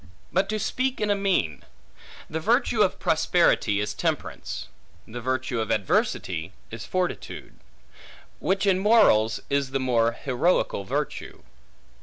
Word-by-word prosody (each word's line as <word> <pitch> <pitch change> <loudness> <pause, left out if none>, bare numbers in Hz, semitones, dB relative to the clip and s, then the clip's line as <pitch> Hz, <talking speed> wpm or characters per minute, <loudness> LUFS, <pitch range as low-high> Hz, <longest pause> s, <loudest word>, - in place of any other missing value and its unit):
But 190 +1 +1
to 215 - 0
speak 255 +5 -1
in 210 -1 +1
a - - +3
mean. 185 - 0 0.7
The - - -3
virtue - - +2
of - - +2
prosperity, 105 0 +2
is 105 0 -2
temperance; - - -3 0.4
the 120 +2 -7
virtue 130 -1 -1
of 110 - -3
adversity, 95 -3 0 0.2
is 115 -1 -7
fortitude; 185 -1 -4 0.8
which 195 +1 0
in 190 -2 +3
morals 190 - +4
is 140 -1 0
the 135 +1 -1
more 115 -3 +2
heroical 130 - 0
virtue. - - -4
130 Hz, 130 wpm, -25 LUFS, -, 0.8 s, morals